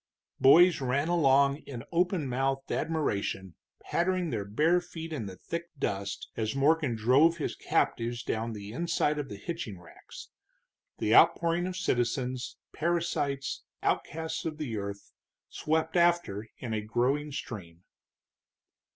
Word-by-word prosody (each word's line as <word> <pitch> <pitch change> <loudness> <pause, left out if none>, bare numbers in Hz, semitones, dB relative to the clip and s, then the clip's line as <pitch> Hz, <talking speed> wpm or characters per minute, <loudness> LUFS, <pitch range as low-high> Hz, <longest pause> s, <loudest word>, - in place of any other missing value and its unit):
Boys 170 +4 +7
ran 135 +5 0
along 140 -4 +4
in 120 -4 -6
open 175 -3 +1
mouthed 135 +2 -1
admiration, 100 - -1 0.3
pattering 180 -1 0
their 110 -4 -1
bare 155 - +2
feet 165 -2 -7
in 115 -9 -4
the 95 - -8
thick 170 - -5
dust, 100 -5 -3
as 110 +2 -2
Morgan 145 -2 +2
drove 135 +10 +4
his 155 - -3
captives 120 +1 0
down 115 0 -2
the 105 -1 -7
inside 150 +1 0
of 140 -2 -4
the - - -6
hitching 110 - -5
racks; 90 - -13 0.7
the 110 - +1
outpouring 170 +6 +5
of 185 0 -4
citizens, 125 -4 -1 0.2
parasites, 155 -4 -1 0.2
outcasts 160 +1 -1
of 155 -2 -4
the 140 -8 -4
earth, 100 -1 -6 0.4
swept 160 +2 -1
after 170 - +2
in 115 -3 -5
a 110 - -1
growing 130 +7 0
stream. 95 -11 -7
140 Hz, 135 wpm, -29 LUFS, 115-165 Hz, 0.7 s, Boys